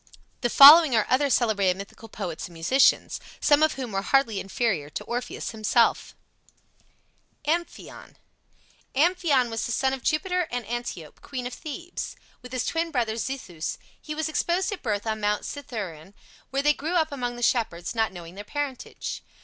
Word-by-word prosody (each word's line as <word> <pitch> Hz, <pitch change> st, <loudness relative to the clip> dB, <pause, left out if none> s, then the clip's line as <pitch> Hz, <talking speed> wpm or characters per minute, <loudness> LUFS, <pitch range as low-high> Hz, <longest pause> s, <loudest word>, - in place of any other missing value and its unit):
The 240 Hz, -, +1 dB
following 290 Hz, +1 st, +9 dB
are 220 Hz, -, +3 dB
other 280 Hz, +2 st, +3 dB
celebrated 200 Hz, -8 st, +2 dB
mythical 200 Hz, +3 st, -10 dB
poets 170 Hz, -6 st, -5 dB
and 175 Hz, -, -16 dB
musicians, 255 Hz, +12 st, +3 dB, 0.2 s
some 290 Hz, 0 st, +4 dB
of 310 Hz, 0 st, +4 dB
whom 255 Hz, -4 st, -6 dB
were 195 Hz, -1 st, -1 dB
hardly 230 Hz, -2 st, +2 dB
inferior 195 Hz, -, -1 dB
to -, -, -5 dB
Orpheus 245 Hz, +1 st, -4 dB
himself: 225 Hz, +1 st, +1 dB, 1.3 s
AMPHION 340 Hz, +3 st, -4 dB, 0.8 s
Amphion 300 Hz, -5 st, +2 dB
was 225 Hz, -, -2 dB
the -, -, -4 dB
son 265 Hz, +3 st, +1 dB
of 265 Hz, -, -4 dB
Jupiter 360 Hz, +4 st, 0 dB
and 245 Hz, -2 st, -4 dB
Antiope, 235 Hz, -9 st, -6 dB
queen 270 Hz, -4 st, -6 dB
of 245 Hz, -, -5 dB
Thebes. 340 Hz, +5 st, -6 dB, 0.3 s
With 250 Hz, 0 st, -11 dB
his 255 Hz, -2 st, -2 dB
twin 330 Hz, 0 st, -1 dB
brother 240 Hz, -7 st, 0 dB
Zethus 225 Hz, -10 st, -4 dB, 0.2 s
he 305 Hz, -, -6 dB
was 315 Hz, 0 st, -1 dB
exposed 345 Hz, +6 st, 0 dB
at 410 Hz, -, -5 dB
birth 210 Hz, -4 st, -2 dB
on 220 Hz, -1 st, -2 dB
Mount 210 Hz, 0 st, 0 dB
Cithaeron, 200 Hz, -, -7 dB, 0.3 s
where 275 Hz, +1 st, -1 dB
they 295 Hz, 0 st, +5 dB
grew 320 Hz, +5 st, -3 dB
up 315 Hz, -3 st, +2 dB
among 245 Hz, -3 st, -3 dB
the 240 Hz, -, -6 dB
shepherds, 195 Hz, -9 st, 0 dB
not 225 Hz, -1 st, +1 dB
knowing 175 Hz, -2 st, -10 dB
their 200 Hz, +2 st, -8 dB
parentage. 285 Hz, +3 st, -5 dB
245 Hz, 165 wpm, -26 LUFS, 210-290 Hz, 1.3 s, following